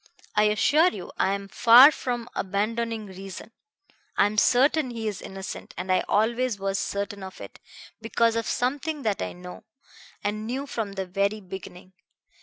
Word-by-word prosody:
"I 210 0 +4
assure 285 - +4
you 190 - -8
I 195 - +2
am 200 0 -7
far 240 +7 +8
from 245 -4 -4
abandoning 220 +3 -2
reason. 195 +3 -9 0.7
I - - +5
am 210 +1 +1
certain 270 +4 +3
he 230 -2 -4
is 205 -3 -4
innocent, 190 0 -8
and 185 - -3
I 185 - +3
always 235 +2 +1
was 195 0 -2
certain 200 0 -3
of 190 0 -9
it, - - -10 0.4
because 230 0 +1
of 230 -1 -1
something 285 +4 -2
that 210 -3 -1
I - - -3
know, 180 0 -11 0.6
and 215 +1 -2
knew 265 +4 -3
from 225 -7 -4
the 195 -1 -3
very 200 +3 -1
beginning. 185 -1 -10
215 Hz, 165 wpm, -26 LUFS, 195-235 Hz, 0.7 s, far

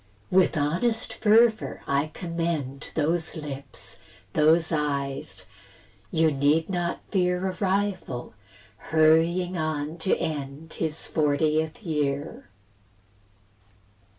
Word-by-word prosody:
With 185 -3 +4
honest 180 +11 0
fervour 220 +1 +3
I 140 +2 +1
commend 165 -6 -3
Those 165 +3 0
lips, 140 -3 -7 0.3
those 160 +2 +4
eyes; 140 -3 -2 0.6
you 160 -1 +3
need 145 +5 +2
not 175 -2 -1
fear 180 -1 +1
A - - -11
rival, 190 - -1 0.6
hurrying 165 +3 +3
on 155 +1 -2
to 185 - +1
end 155 -1 -4
His 160 -1 -2
fortieth 155 +4 +1
year. 145 - -2
160 Hz, 95 wpm, -26 LUFS, 150-175 Hz, 0.6 s, With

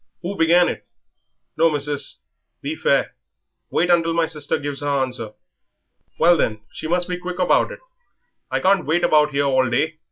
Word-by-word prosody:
Who 190 +3 -4
began 175 +1 +4
it? - - -5 0.7
No, 165 +1 +4
missis, 145 - -3 0.4
be - - -3
fair; - - +1 0.6
wait 180 +1 +1
until 165 -1 +2
my 165 -1 +2
sister 150 -3 -2
gives 145 -1 -5
her 145 - -2
answer." 130 -6 -2 0.8
"Well, 170 +1 +5
then, 110 -7 -1
she - - -6
must 175 +1 0
be 180 -1 -3
quick 180 0 -6
about 185 - +2
it - - -10 0.7
I - - -1
can't 190 -3 +2
wait 165 +3 +1
about 150 -1 +4
here 140 -1 0
all 130 -2 +2
day." 155 +6 -1
160 Hz, 170 wpm, -21 LUFS, 140-175 Hz, 0.8 s, Well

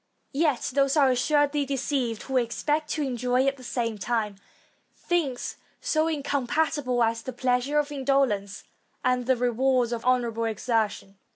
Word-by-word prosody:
Yet 290 -4 +1
those 275 +2 +2
are 275 -3 +5
assuredly 290 +3 +2
deceived, 265 -4 -2
who 265 -1 -1
expect 295 +6 0
to 305 - -1
enjoy 250 0 +1
at 275 0 +1
the 255 - -13
same 230 -3 -2
time 215 -1 -1 0.6
things 300 -8 -2 0.2
so 310 +1 +1
incompatible 285 -3 0
as 230 0 0
the 260 - -5
pleasures 255 +4 +1
of 290 - -14
indolence 265 -8 0 0.4
and 250 -1 +1
the 260 -1 +3
rewards 245 0 +2
of 235 -1 -3
honorable 235 -2 +1
exertion. 220 -3 -1
255 Hz, 145 wpm, -26 LUFS, 235-285 Hz, 0.6 s, are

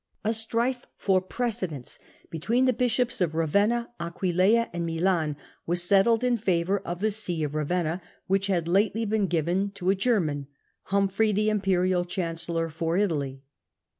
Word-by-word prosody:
A 220 +1 +1
strife 235 +3 -1
for 190 -2 +2
precedence 185 - -3 0.3
between 230 +11 +1
the 255 - +3
bishops 245 -1 +1
of 160 -3 +1
Ravenna, 205 +10 +1
Aquileia, 185 +6 +2
and 170 -1 -2
Milan, 165 -2 0 0.3
was 175 +1 +1
settled 200 +6 +4
in 250 -1 +2
favour 190 -1 +1
of 175 -1 -6
the 215 +1 +2
See 180 -6 -1
of 150 -1 -3
Ravenna, 165 +3 -1 0.2
which 195 +1 +1
had 175 -4 0
lately 205 +5 +2
been 210 -2 +1
given 175 +4 0
to 185 -1 +1
a - - +1
German, 175 - 0 0.4
Humphrey, 200 +2 +1
the 215 +1 +1
Imperial 185 -3 +1
Chancellor 165 -2 -2
for 165 +2 -2
Italy. 140 -9 -1
190 Hz, 150 wpm, -26 LUFS, 170-215 Hz, 0.4 s, settled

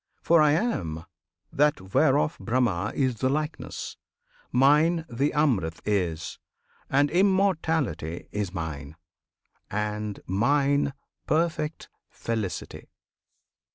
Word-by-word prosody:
For 170 -1 +5
I 150 -1 +5
am 85 - -1 0.5
That 145 -11 +1
whereof 150 +2 +3
Brahma 110 -5 0
is 130 -4 +1
the 130 - +1
likeness! 150 +3 -4 0.5
Mine 150 +6 +4
The 135 +4 0
Amrit 110 - +1
is; 90 -6 -1 0.5
and 145 +2 +3
Immortality 165 - +1
Is 105 -3 -2
mine; 80 -4 -5 0.7
and 105 0 -3
mine 140 +8 +2 0.3
perfect 160 -1 0 0.2
Felicity! 110 -5 -4
135 Hz, 90 wpm, -26 LUFS, 100-155 Hz, 0.7 s, For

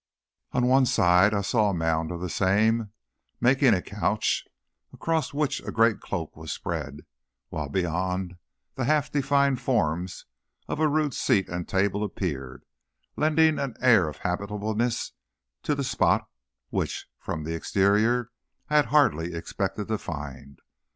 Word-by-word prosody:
On 125 0 +1
one 130 +1 +4
side 90 -1 +4
I 100 -1 0
saw 105 +1 +2
a 100 - -1
mound 80 -1 0
of 85 -1 -5
the 90 - -2
same, 105 +5 +2 0.5
making 130 -1 +4
a 90 - -3
couch, 105 +1 -1 0.4
across 165 -1 -1
which 145 0 -1
a - - -6
great 115 -1 +3
cloak 85 -5 -5
was 80 0 -7
spread; 75 -3 -4 0.5
while 75 -3 -4
beyond, 90 +2 -2 0.4
the 130 - -2
half 150 0 +1
defined 140 -2 +2
forms 90 -8 -1 0.4
of - - -3
a 155 - +4
rude 150 -2 +1
seat 95 -3 +1
and 90 0 -4
table 100 +1 +1
appeared, 70 -11 -4 0.5
lending 155 0 +3
an 135 -5 -3
air 115 -10 +5
of 75 - -10
habitableness 105 +5 -2 0.5
to 150 - 0
the 140 - -2
spot, - - +1 0.4
which, - - -2
from 80 - -4
the 80 +2 -3
exterior, 105 +8 +2 0.4
I 150 - +5
had 150 - +5
hardly 85 - +2
expected 95 +4 -3
to 110 -2 0
find. 70 -4 -7
100 Hz, 145 wpm, -26 LUFS, 85-125 Hz, 0.5 s, air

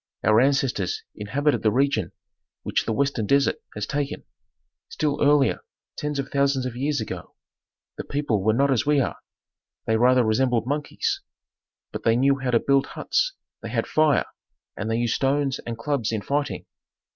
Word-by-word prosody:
Our 110 +1 +5
ancestors 135 -7 +1
inhabited 140 +8 0
the 110 - +3
region 120 -7 +1 0.5
which - - 0
the - - +1
western 130 -3 0
desert 140 +2 +3 0.2
has 105 -1 -3
taken. 140 +3 -3 0.7
Still 150 -1 -1
earlier 145 -1 +4 0.4
tens 150 -1 -3
of 135 0 -3
thousands 140 -2 +1
of 125 -2 -4
years 140 +3 -1
ago 110 - -6 0.6
the - - -2
people 140 -8 -1
were 110 +3 +2
not 140 +2 +3
as 120 -4 +2
we 150 0 +3
are, 130 - -1 0.7
they 110 - +2
rather 125 +2 +4
resembled 115 +1 +1
monkeys, 145 +3 -2 0.7
but - - -5
they 115 - +3
knew 135 +2 +3
how 130 -1 -2
to 120 -2 +4
build 140 +2 +2
huts, - - -1 0.3
they - - -6
had - - -1
fire, 155 -2 +3 0.5
and 110 - -4
they 115 - +1
used 120 -1 0
stones 135 0 0
and 115 -1 -4
clubs 120 -2 -1
in 110 -3 -2
fighting. 145 +1 -2
135 Hz, 170 wpm, -24 LUFS, 115-140 Hz, 0.7 s, Our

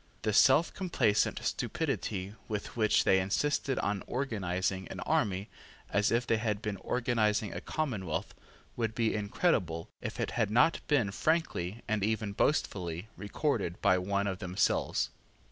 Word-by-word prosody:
The 110 - +1
selfcomplacent 135 - +3
stupidity 105 - -2
with 105 -2 -4
which 110 -2 +3
they 95 - +4
insisted 135 +8 0
on 100 -1 -1
Organising 95 -7 -2
an - - -7
army 100 0 0 0.4
as 100 +1 +3
if 120 +1 +2
they 115 - +2
had 110 -2 -1
been 105 -2 -3
organising 110 -4 0
a - - -5
commonwealth 110 - -3 0.4
would 110 -2 -2
be 115 -2 +1
incredible 100 - 0
if - - -5
it - - -1
had 110 -4 0
not 120 +10 +4
been 125 -10 +2
frankly 115 - -1
and 110 -2 0
even 110 -1 0
boastfully 95 - 0
recorded 100 - -2
by 95 -2 +4
one 100 +2 0
of 95 -2 -2
themselves. 90 -1 0
105 Hz, 140 wpm, -31 LUFS, 95-120 Hz, 0.4 s, they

